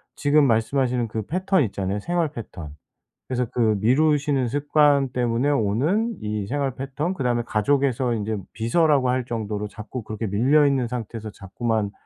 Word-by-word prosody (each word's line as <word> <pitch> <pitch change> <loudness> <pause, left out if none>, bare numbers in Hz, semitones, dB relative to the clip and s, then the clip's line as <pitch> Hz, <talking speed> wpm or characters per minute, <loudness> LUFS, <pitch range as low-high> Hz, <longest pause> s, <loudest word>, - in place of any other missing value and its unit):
지금 145 0 +3
말씀하시는 125 +1 +1
그 110 0 -3
패턴 185 - +1
있잖아요 100 -2 -2
생활 170 +1 -1
패턴. 85 - -8 0.5
그래서 125 -1 -1
그 110 -3 +2
미루시는 140 +1 +2
습관 145 +1 +3
때문에 120 +2 0
오는 145 - +1
이 105 -1 -3
생활 140 +1 -1
패턴 145 +6 -3
그다음에 125 -7 0
가족에서 125 +2 +1
인제 110 -1 -2 0.2
비서라고 135 +3 +2
할 125 0 0
정도로 105 -3 -3
자꾸 110 +4 -7
그렇게 110 +1 -5
밀려 130 +10 +3
있는 130 -4 +1
상태에서 115 -2 -5
자꾸만 105 +2 -2
125 Hz, 360 characters per minute, -23 LUFS, 110-145 Hz, 0.5 s, 지금